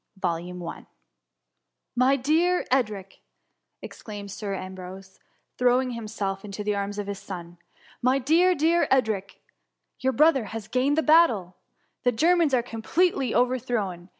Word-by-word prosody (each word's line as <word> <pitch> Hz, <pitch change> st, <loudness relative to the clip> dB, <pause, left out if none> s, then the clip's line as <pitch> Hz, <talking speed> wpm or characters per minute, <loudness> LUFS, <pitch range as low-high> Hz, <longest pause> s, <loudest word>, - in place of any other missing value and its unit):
*^ 175 Hz, -1 st, -4 dB, 1.1 s
My 255 Hz, +3 st, +4 dB
dear 320 Hz, +7 st, +1 dB
Edric, 210 Hz, -7 st, -1 dB, 0.6 s
exclaimed 205 Hz, -2 st, -8 dB
Sir 200 Hz, 0 st, -4 dB
Ambrose^ 190 Hz, 0 st, -9 dB, 0.4 s
thro^ng 250 Hz, 0 st, +2 dB
himself 210 Hz, -4 st, -4 dB
into 210 Hz, 0 st, -6 dB
the 210 Hz, 0 st, 0 dB
arms 200 Hz, 0 st, -3 dB
of 205 Hz, -, -3 dB
his 200 Hz, -1 st, -5 dB
son, 175 Hz, -2 st, -9 dB
*^ -, -, -43 dB, 0.4 s
my 255 Hz, +2 st, +3 dB
dear, 330 Hz, +7 st, +3 dB
dear 330 Hz, +3 st, +2 dB
Edric! 220 Hz, -7 st, 0 dB, 0.6 s
your 265 Hz, 0 st, 0 dB
brother 285 Hz, -2 st, +4 dB
has 220 Hz, 0 st, -7 dB
gained 265 Hz, +5 st, +1 dB
the 320 Hz, -, +2 dB
battle! 235 Hz, -, +4 dB, 0.5 s
The 245 Hz, -, +2 dB
Germans 325 Hz, +3 st, +3 dB
are 240 Hz, -, +1 dB
completely 265 Hz, +5 st, 0 dB
over 250 Hz, +1 st, +2 dB
thrown. 195 Hz, -8 st, -3 dB
225 Hz, 135 wpm, -25 LUFS, 195-270 Hz, 1.1 s, My